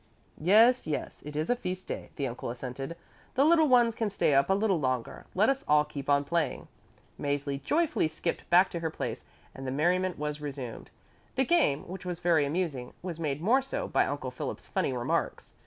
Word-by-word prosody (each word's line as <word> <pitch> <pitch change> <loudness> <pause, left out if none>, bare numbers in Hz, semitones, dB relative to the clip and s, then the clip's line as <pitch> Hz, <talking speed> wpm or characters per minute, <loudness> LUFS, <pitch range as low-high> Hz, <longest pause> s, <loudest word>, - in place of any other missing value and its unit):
"Yes, 220 +7 +5
yes, 150 - -4
it 150 - -7
is 155 +2 -1
a - - +3
feast 185 -5 -5
day," - - -6
the 140 - -2
uncle 120 -1 -5
assented; 130 +5 -5 0.4
"the 270 +2 +4
little 320 -1 +5
ones 240 -3 +5
can 220 -1 -1
stay 195 -6 +1
up 140 +4 +4
a 195 - +4
little 200 -4 +2
longer. 130 -4 -2
Let 205 +4 +4
us 270 0 +1
all 150 0 +5
keep 145 -2 -7
on 140 0 +4
playing." 165 +2 -1 0.5
Mäzli 140 -1 -2
joyfully 310 - +1
skipped 160 +2 -4
back 180 +2 +5
to 170 - -3
her 165 -1 -1
place, - - -5 0.3
and 135 0 -7
the - - -1
merriment 180 +6 +1
was 150 0 -4
resumed. 135 -5 -6 0.5
The 265 +1 +2
game, 285 - +2
which 190 +2 -7
was 180 -1 -4
very 170 -4 +3
amusing, 145 -6 -2
was 175 -3 -5
made 150 -1 -2
more 250 +8 +4
so 270 - -4
by - - +2
Uncle - - -3
Philip's - - -5
funny - - -1
remarks. - - -2
165 Hz, 200 wpm, -29 LUFS, 140-200 Hz, 0.5 s, Yes